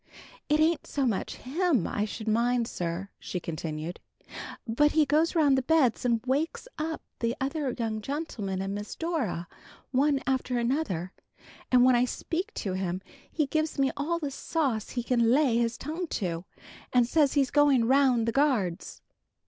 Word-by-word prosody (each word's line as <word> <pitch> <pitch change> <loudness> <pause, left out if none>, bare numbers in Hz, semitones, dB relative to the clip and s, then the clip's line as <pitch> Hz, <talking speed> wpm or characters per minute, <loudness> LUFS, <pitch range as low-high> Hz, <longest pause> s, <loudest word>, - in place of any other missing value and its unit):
"It 300 +1 +3
ain't 320 +1 +2
so 280 -2 -1
much 220 -6 -1
him 290 - 0
I 205 - -1
should 220 +1 -7
mind, 235 +2 +2
sir," 175 +1 -4
she 180 - -4
continued, 160 0 -5 0.7
"but 295 +7 +3
he 310 -1 +4
goes 310 +4 +2
round 295 -4 +5
the 265 - +2
beds 260 -4 +2
and 235 -2 +2
wakes 290 - -1
up 315 +1 -3 0.2
the 235 +1 0
other 275 -1 -2
young 220 -2 -2
gentlemen 215 - -3
and 195 0 -3
Miss 205 +1 -5
Dora, 275 - -2 0.4
one 275 +2 +3
after 255 -1 0
another, 235 - -1 0.6
and 250 -1 +6
when 255 -1 +6
I 240 +1 +4
speak 355 - -3
to 190 - -3
him, 185 0 -2 0.3
he 310 - +1
gives 310 +3 -1
me 270 -1 +2
all 325 +4 -1
the 295 -4 -3
sauce 265 -7 -1
he 245 - -3
can 235 -2 +2
lay 260 -2 +4
his 235 0 0
tongue 325 +5 -4
to, 175 - -3 0.5
and 245 -1 +4
says 290 +1 +3
he's 275 -3 +2
going 285 -5 +4
round 255 -3 +3
the - - +2
guards. 230 - 0
255 Hz, 170 wpm, -28 LUFS, 220-295 Hz, 0.7 s, and